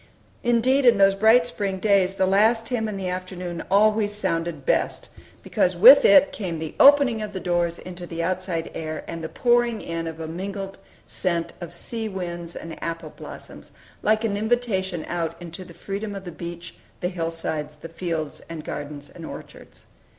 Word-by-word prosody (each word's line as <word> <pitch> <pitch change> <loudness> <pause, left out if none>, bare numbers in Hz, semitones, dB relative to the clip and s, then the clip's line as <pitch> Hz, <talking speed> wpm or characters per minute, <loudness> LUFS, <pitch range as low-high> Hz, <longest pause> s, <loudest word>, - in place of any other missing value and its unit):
Indeed, 240 +3 +3
in 235 -3 +6
those 195 0 +5
bright 220 +4 +5
spring 200 -5 -2
days, 195 -1 +2
the 190 -1 +2
last 220 +4 +3
hymn 225 -3 -1
in 205 - -4
the 190 -1 -3
afternoon 180 -1 -5
always 210 +1 +3
sounded 165 -7 -2
best, - - 0 0.3
because - - +1
with - - +10
it 290 -1 +7
came 180 -6 -4
the 160 -1 -5
opening 275 -5 +6
of 210 -1 -5
doors 175 -1 0
into 180 -1 -9
the 165 0 -4
outside 180 -2 -2
air, 155 -1 -5
and 165 -1 -6
the 160 - -4
pouring 240 -2 +2
in 165 -2 -4
of 160 0 -7
a 160 - -5
mingled 195 +3 -5 0.3
scent 170 -2 -2
of 170 0 -7
sea 225 +5 -4
winds 175 -3 -5
and 165 - -8
apple 165 -2 -4
blossoms, - - -11 0.3
like 215 +1 +2
an 205 -3 0
invitation 205 -6 -1
out 170 -1 -3
into 175 +1 -8
the 175 - -13
freedom 200 +4 -5
of 195 -1 -7
the 175 - -6
beach, 170 0 -8 0.3
the 180 - -1
hillsides, 165 -3 -4
the 150 +2 -9
fields 165 -2 -4
and 165 -2 -6
gardens 145 -1 -6
and 170 - -11
orchards. - - -11
185 Hz, 175 wpm, -24 LUFS, 165-215 Hz, 0.3 s, with